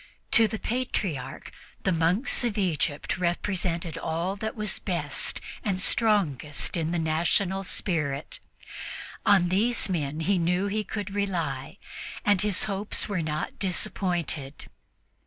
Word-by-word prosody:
To 225 Hz, -1 st, +7 dB
the 220 Hz, -, -3 dB
Patriarch, 210 Hz, -, -2 dB, 0.3 s
the 190 Hz, -, +2 dB
monks 180 Hz, +11 st, +2 dB
of 230 Hz, -3 st, 0 dB
Egypt 165 Hz, -4 st, 0 dB
represented 175 Hz, -1 st, -1 dB
all 170 Hz, +4 st, -1 dB
that 220 Hz, +1 st, -3 dB
was 210 Hz, -2 st, -1 dB
best 150 Hz, -6 st, -1 dB, 0.2 s
and 195 Hz, -3 st, 0 dB
strongest 185 Hz, -, +2 dB
in 165 Hz, -2 st, 0 dB
the 175 Hz, -, 0 dB
national 170 Hz, +4 st, +2 dB
spirit. 150 Hz, -7 st, -2 dB, 0.9 s
On 190 Hz, -3 st, +6 dB
these 215 Hz, +5 st, +2 dB
men 155 Hz, -3 st, -1 dB
he 190 Hz, +3 st, +2 dB
knew 180 Hz, +3 st, +2 dB
he 210 Hz, +2 st, 0 dB
could 205 Hz, -2 st, -4 dB
rely, 170 Hz, -7 st, -2 dB, 0.5 s
and 205 Hz, -3 st, +5 dB
his 205 Hz, -3 st, +2 dB
hopes 200 Hz, 0 st, -2 dB
were 200 Hz, -4 st, -1 dB
not 155 Hz, -1 st, -3 dB
disappointed. 175 Hz, -7 st, -1 dB
180 Hz, 125 wpm, -27 LUFS, 160-205 Hz, 0.9 s, To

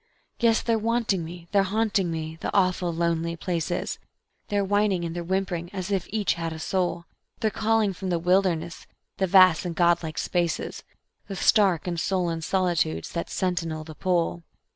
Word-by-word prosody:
Yes, 230 Hz, -2 st, +3 dB
they're 230 Hz, -1 st, +1 dB
wanting 225 Hz, -5 st, 0 dB
me, 170 Hz, +1 st, -9 dB
they're 200 Hz, -, +4 dB
haunting 200 Hz, -1 st, +1 dB
me, 160 Hz, -1 st, -4 dB
the -, -, -2 dB
awful 185 Hz, -2 st, +2 dB
lonely 170 Hz, 0 st, -1 dB
places; 175 Hz, +1 st, -2 dB, 0.5 s
They're 205 Hz, -1 st, 0 dB
whining 205 Hz, -3 st, +1 dB
and 165 Hz, 0 st, -4 dB
they're 175 Hz, -, -3 dB
whimpering 175 Hz, -1 st, -2 dB
as 190 Hz, 0 st, -4 dB
if 190 Hz, -3 st, 0 dB
each 215 Hz, -1 st, +1 dB
had 165 Hz, -1 st, -4 dB
a 160 Hz, -, -6 dB
soul; 175 Hz, 0 st, -1 dB, 0.3 s
They're 220 Hz, -2 st, +1 dB
calling 220 Hz, -2 st, +1 dB
from 190 Hz, 0 st, -5 dB
the 175 Hz, -, +1 dB
wilderness, 175 Hz, -1 st, 0 dB, 0.3 s
the 190 Hz, -, +1 dB
vast 185 Hz, -3 st, +6 dB
and 175 Hz, -2 st, -4 dB
God 175 Hz, 0 st, +3 dB
like 160 Hz, -2 st, -6 dB
spaces, 175 Hz, -2 st, -1 dB, 0.4 s
The 195 Hz, -, -5 dB
stark 195 Hz, -5 st, +3 dB
and 175 Hz, -2 st, -2 dB
sullen 175 Hz, -3 st, -1 dB
solitudes 170 Hz, -, 0 dB
that 170 Hz, -, -4 dB
sentinel 170 Hz, -4 st, -2 dB
the 155 Hz, 0 st, -10 dB
Pole. 175 Hz, 0 st, 0 dB
180 Hz, 170 wpm, -26 LUFS, 170-195 Hz, 0.5 s, vast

